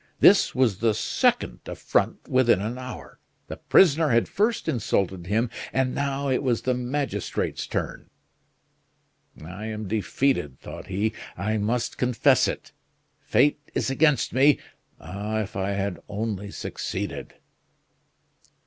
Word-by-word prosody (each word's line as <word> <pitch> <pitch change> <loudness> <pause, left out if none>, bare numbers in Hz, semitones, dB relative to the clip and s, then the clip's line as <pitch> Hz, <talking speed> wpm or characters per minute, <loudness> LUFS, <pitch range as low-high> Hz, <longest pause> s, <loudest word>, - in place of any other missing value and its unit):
This - - +6
was 115 -7 +2
the 110 -2 +2
second 60 - +1
affront - - -1
within 125 -6 +4
an 115 +5 -4
hour. 130 -1 -9 0.3
The - - -7
prisoner 160 -3 +4
had 115 -2 +3
first 215 +3 0
insulted 95 -6 -1
him, 115 +4 +1 0.2
and 130 -1 +1
now 140 0 -1
it 130 -2 +1
was 125 -5 0
the 130 - +1
magistrate's 130 +3 -2
turn. - - -4 1.4
"I 95 +6 -7
am 110 -1 -5
defeated," 110 - 0
thought - - -9
he. 105 +4 -1 0.2
"I 105 +4 -1
must 115 +3 -1
confess 125 -3 +3
it. - - -5 0.5
Fate 140 +6 +2 0.2
is - - 0
against 145 -2 +2
me! 140 +2 +5 0.4
Ah! 105 +6 -3
if 105 0 -6
I 95 +1 -1
had 100 -2 -2
only 105 -1 -3
succeeded!" - - -5
115 Hz, 130 wpm, -25 LUFS, 100-130 Hz, 1.4 s, This